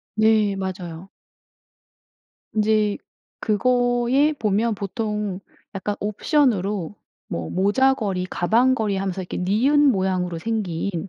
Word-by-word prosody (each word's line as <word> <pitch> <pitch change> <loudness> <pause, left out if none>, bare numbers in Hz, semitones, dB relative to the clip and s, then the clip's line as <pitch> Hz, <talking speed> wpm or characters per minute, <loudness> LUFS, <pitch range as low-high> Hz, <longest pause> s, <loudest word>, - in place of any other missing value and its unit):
네 215 -2 +3
맞아요. 185 -1 -6 1.4
인제 215 -1 +2 0.4
그거에 245 +5 +2
보면 220 -1 0
보통 210 -1 -3 0.3
약간 205 +2 -3
옵션으로 210 - 0 0.3
뭐 85 -1 -4
모자걸이 205 -1 +1
가방걸이 220 +2 +1
하면서 190 -1 -2
이렇게 175 - -6
니은 265 +11 +3
모양으로 185 -4 -1
생긴 190 -3 -3
210 Hz, 225 characters per minute, -22 LUFS, 190-230 Hz, 1.4 s, 네